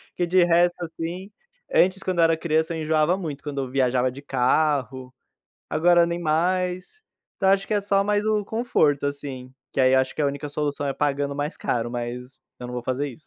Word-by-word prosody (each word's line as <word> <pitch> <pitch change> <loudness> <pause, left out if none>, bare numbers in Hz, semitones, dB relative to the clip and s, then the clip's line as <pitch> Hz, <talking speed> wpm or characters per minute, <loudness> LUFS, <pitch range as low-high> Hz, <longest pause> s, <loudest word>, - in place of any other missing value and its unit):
que 175 - 0
de 180 +1 +4
resto, 175 +1 +3
assim, 170 +3 -5 0.4
antes, 190 - +3
quando 185 -2 -2
eu - - +6
era 165 0 +3
criança, 160 0 0
eu - - -4
enjoava 155 +3 +2
muito 155 -7 -6
quando 145 -2 -4
eu 130 - -5
viajava 130 -1 +1
de 135 +3 -10
carro, 130 -1 0 0.6
agora 175 +2 +4
nem 170 0 -3
mais. 180 - -1 0.4
Então 190 - +2
eu - - +7
acho 195 0 -1
que - - -1
é 205 - +3
só 195 0 +2
mais 205 +1 0
o 215 -1 +1
conforto, 195 - +1
assim, 135 -3 -5 0.2
que - - -4
aí 130 0 +5
eu 130 - +5
acho 130 0 -1
que - - -3
a - - +2
única 140 +1 -4
solução 145 0 -2
é 135 - -1
pagando 140 0 -1
mais 145 +3 -3
caro, 120 -1 -2
mas 125 +2 -6 0.2
eu 125 - -7
não 125 - -7
vou 125 -1 -4
fazer 130 +3 -1
isso. 140 +4 -14
155 Hz, 215 wpm, -24 LUFS, 135-175 Hz, 0.6 s, eu